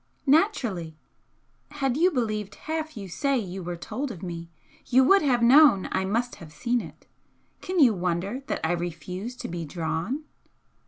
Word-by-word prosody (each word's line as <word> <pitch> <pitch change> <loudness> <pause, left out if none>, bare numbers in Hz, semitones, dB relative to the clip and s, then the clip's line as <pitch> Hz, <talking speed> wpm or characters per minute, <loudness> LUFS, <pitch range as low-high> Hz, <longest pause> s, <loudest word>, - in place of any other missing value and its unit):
"Naturally! 240 - +1 0.7
Had 275 -4 -1
you 345 +5 +4
believed 215 - -2
half 315 -3 -4
you 200 -2 -6
say 275 - 0
you 190 -4 -4
were 175 0 -4
told 265 +11 -4
of 190 -7 -8
me, 170 -2 -6 0.4
you 260 +1 +5
would 390 +9 +6
have 250 -5 +2
known 260 -5 +7
I 190 0 0
must 235 +5 -1
have 160 -3 -12
seen 240 +9 0
it. - - -12 0.6
Can 370 0 -2
you 255 -7 +7
wonder 185 +6 -2
that - - -2
I 160 - +1
refuse 175 +6 -4
to - - -6
be 170 0 -4
'drawn'?" 165 - -3
215 Hz, 165 wpm, -26 LUFS, 175-275 Hz, 0.7 s, known